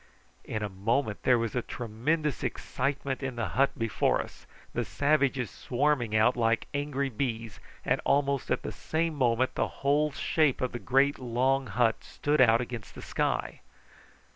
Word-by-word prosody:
In 110 - -3
a - - 0
moment 105 +4 -1
there 125 -1 +4
was 115 -2 -2
a 125 - +1
tremendous 125 +8 -2
excitement 135 +2 -2
in 130 -2 -3
the 115 -1 -2
hut 135 +1 +1
before 115 -2 +1
us, - - -8 0.3
the - - 0
savages 140 -5 +1
swarming 125 -4 0
out 110 +3 +4
like 115 -1 +1
angry 145 -1 -1
bees, 115 -3 -3 0.3
and - - +1
almost 140 -1 +1
at - - 0
the - - -4
same 165 +1 -1
moment 130 -2 +1
the - - 0 0.2
whole 150 +2 +3
shape 145 0 +1
of 130 - -1
the 120 - -5
great 135 +6 +2
long 130 +2 +1
hut 115 +1 +1
stood 145 -1 0
out 115 -1 +6
against 120 -3 -7
the - - -9
sky. - - -1
130 Hz, 165 wpm, -29 LUFS, 115-140 Hz, 0.3 s, out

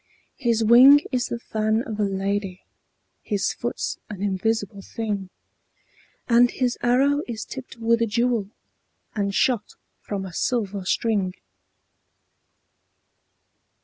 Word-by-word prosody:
His 235 -4 +1
wing 255 +6 +8
is 250 -2 0
the 235 - -3
fan 220 0 -1
of 215 -4 -6
a - - +2
lady, 195 -1 -2 0.6
His 205 -3 -1
foot's 240 - -4
an 200 -2 -6
invisible 205 0 -1
thing, 205 -3 -4 1.0
And 240 0 +5
his 250 -1 -1
arrow 275 +4 +3
is 225 -2 -5
tipped 265 -3 -9
with 230 0 +1
a 230 - +2
jewel, 230 -1 0 0.6
And 200 -2 -2
shot 235 -5 +1 0.2
from 195 -2 -5
a 185 - -9
silver 200 -3 -1
string. 195 -3 0
220 Hz, 115 wpm, -24 LUFS, 200-240 Hz, 1.0 s, wing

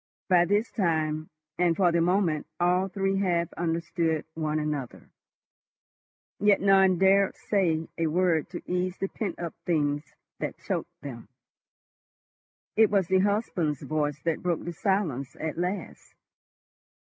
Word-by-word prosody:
By 175 -2 +5
this 205 +5 +1
time 155 -4 0 0.3
and 175 -2 +3
for 180 -3 +4
the 170 0 +2
moment 175 -3 +1
all 180 +2 +2
three 195 0 -1
half 175 -3 0
understood 165 -1 -1
one 155 -1 -1
another. 150 -5 -4 1.3
Yet 205 -1 +4
none 195 -2 +5
dared 195 +1 +4
say 165 -6 0
a 165 - +2
word 170 -1 +1
to 175 - -7
ease 180 +1 -1
the 195 - -2
pent 195 -6 -4
up 170 -2 -5
things 145 -3 -1 0.2
that - - -4
choked - - -4
them. 120 -7 -8 1.5
It 220 -1 +5
was 195 -4 +1
the 190 0 +4
husband's 185 - 0
voice 150 -2 -1
that 165 -2 -1
broke 175 -3 -1
the 175 - -4
silence 165 - -1
at 160 +1 -3
last. 180 +3 -4
175 Hz, 135 wpm, -27 LUFS, 155-190 Hz, 1.5 s, By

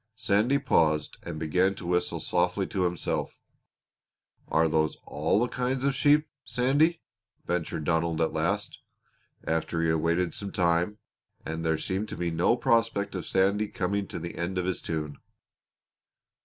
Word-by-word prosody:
Sandy 110 +6 +2
paused 80 - +1
and 85 -2 -6
began 90 +5 +1
to 95 - -9
whistle 90 0 0
softly - - 0
to 95 - -1
himself. 90 -2 -2 1.1
"Are 80 +1 +3
are - - +3
those 80 -1 +1
all 75 +7 +1
the 120 - +2
kinds 125 +1 -2
of 140 0 +2
sheep, 150 +3 +4 0.2
Sandy?" 145 +7 +2 0.4
ventured 85 -3 -2
Donald 80 +1 0
at 80 - +1
last, - - -1 0.6
after 80 +1 -1
he 80 - +2
had 80 - +3
waited 85 +2 +1
for - - -5
some 100 -1 -5
time 85 +3 +1 0.5
and 80 +1 -4
there 80 -1 +1
seemed 95 +6 -3
to - - -6
be 85 -1 -1
no 85 +9 +2
prospect 115 -4 +1
of 90 -3 -5
Sandy 100 +3 +2
coming 100 +1 -2
to - - -6
the 85 +1 -6
end 90 +2 -2
of 90 - 0
his 95 -1 -2
tune. 75 -3 -4
90 Hz, 165 wpm, -28 LUFS, 80-105 Hz, 1.1 s, sheep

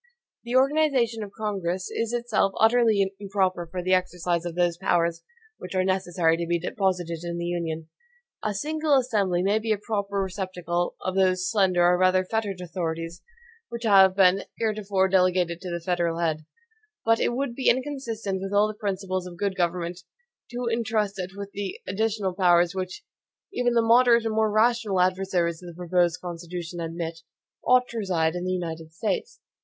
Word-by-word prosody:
The 240 +1 -3
organization 265 -4 +2
of 205 -2 -6
Congress 190 -4 -2
is 230 0 -2
itself 235 -5 0
utterly 220 -4 +4
improper 190 -3 -1
for 180 +2 -5
the 185 +1 +2
exercise 180 -2 0
of 170 -1 -4
those 175 -1 +2
powers 170 -2 +1 0.4
which - - -7
are 185 - +2
necessary 180 -3 +1
to 170 0 -3
be 175 - +2
deposited 180 -2 -1
in 170 0 -4
the 170 - -3
Union. 165 -2 -3 0.6
A 210 -1 -1
single 305 +5 +1
assembly 205 -9 +1
may 205 +3 +2
be 220 0 -2
a 215 - +2
proper 200 -1 -2
receptacle 185 -2 -2
of 185 - -2
those 185 -1 +2
slender, 185 -5 +3
or 180 0 +4
rather 185 0 +3
fettered, 205 -2 -2
authorities, 165 -1 -4 0.5
which 235 0 -6
have 195 -3 +6
been 190 0 +4
heretofore 205 -4 0
delegated 180 -2 +2
to 185 - -6
the 170 0 -3
federal 170 -1 -1
head; 155 -2 -1 0.6
but 225 0 +4
it 240 - 0
would 270 -1 -2
be 260 +2 +1
inconsistent 235 -7 -2
with 195 0 -4
all 205 +1 +4
the 215 - -5
principles 190 -3 -3
of 175 -1 -10
good 200 0 -1
government, 175 0 -1 0.5
to 245 +1 -4
intrust 220 -3 -1
it 185 +1 -5
with 200 0 -6
those 200 -2 -4
additional 205 -1 -1
powers 175 -1 +4
which, 185 - -5 0.5
even 245 -7 +1
the 230 - +4
moderate 235 0 +5
and 225 - -1
more 220 0 +2
rational 220 -2 +2
adversaries 180 -2 +1
of 180 - -10
the 170 -1 -10
proposed 175 -1 +1
Constitution 175 0 -6
admit, 165 0 -4 0.4
ought 250 0 +4
to 230 - -4
reside 170 -6 0
in 180 0 -4
the 185 - -1
United 165 -3 -4
States. 235 - -3
190 Hz, 175 wpm, -25 LUFS, 175-220 Hz, 0.6 s, have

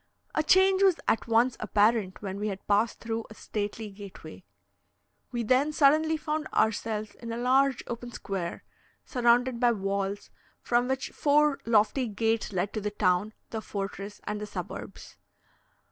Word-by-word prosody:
A - - +2
change 380 +4 +4
was 385 -4 +4
at 225 - +1
once 235 +2 +3
apparent 210 -1 +1
when 195 0 -4
we 210 - -1
had 195 -2 -5
passed 210 +3 +2
through 225 -1 -3
a 215 - -12
stately 210 0 -4
gateway. 195 -4 -11 0.9
We 240 -2 -2
then 260 +6 +3
suddenly 310 +2 +4
found 305 0 -3
ourselves 215 -1 0
in 230 -1 -8
a 230 - -3
large 260 +2 +2
open 240 0 -6
square, 190 -6 -4 0.4
surrounded 245 0 +2
by 240 -1 +4
walls, 200 0 -3 0.3
from 240 +1 +1
which 265 0 -2
four 295 0 +3
lofty 230 +3 +3
gates 225 +1 0
led 190 +1 -1
to 215 - -2
the 210 - -1
town, 200 0 +1 0.2
the 220 - -3
fortress, 200 0 -5
and 210 0 -4
the 210 - -4
suburbs. - - -8
225 Hz, 155 wpm, -28 LUFS, 205-255 Hz, 0.9 s, change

